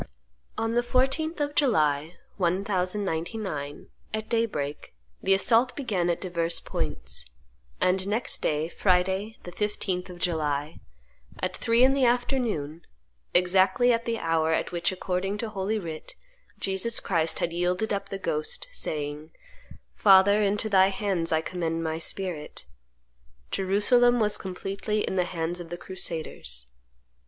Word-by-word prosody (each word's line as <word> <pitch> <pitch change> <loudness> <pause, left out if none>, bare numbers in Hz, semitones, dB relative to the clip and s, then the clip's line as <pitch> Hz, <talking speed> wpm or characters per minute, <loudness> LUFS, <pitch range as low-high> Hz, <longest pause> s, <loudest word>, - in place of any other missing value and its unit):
On 225 0 0
the 240 - +3
14th 270 +7 +1
of 290 0 -1
July, 155 - +2 0.2
1099, 185 -4 -1 0.3
at 220 0 -5
daybreak, 150 - -2 0.3
the 195 - +4
assault 235 +5 +3
began 200 -11 0
at 170 - 0
divers 170 -2 0
points; 60 +1 -4 0.5
and 185 +1 +2
next 220 +4 -1
day, 150 +1 0
Friday, 190 +4 +1
the 175 - -8
15th 190 -2 -2
of 180 - -9
July, 155 -3 -1 0.6
at 185 0 -2
three 230 +1 +3
in 265 +1 +6
the 275 -1 +1
afternoon, 240 - 0 0.5
exactly 190 +7 +4
at 230 0 -1
the 230 -1 -1
hour 165 -3 +1
at - - 0
which, 170 0 +1
according 190 +2 -2
to 225 +1 -3
Holy 200 +1 -1
Writ, 165 -6 -7 0.4
Jesus 195 +4 0
Christ 165 -3 0
had 170 - -1
yielded 180 +5 0
up 200 0 -3
the 195 - -3
ghost, 460 - -2
saying, 150 - -4 0.6
"Father, 200 +1 +6
into 205 +1 +1
Thy 190 -2 +5
hands 190 -4 -1
I 160 0 +3
commend 165 -1 -2
My 160 0 -2
spirit," 170 - -3 0.9
Jerusalem 240 +6 +3
was 210 -2 +2
completely 195 +3 -3
in - - -2
the 180 -1 +2
hands 175 0 -3
of 170 -1 -8
the 175 - -5
crusaders. 160 - -4
190 Hz, 135 wpm, -27 LUFS, 165-220 Hz, 0.9 s, in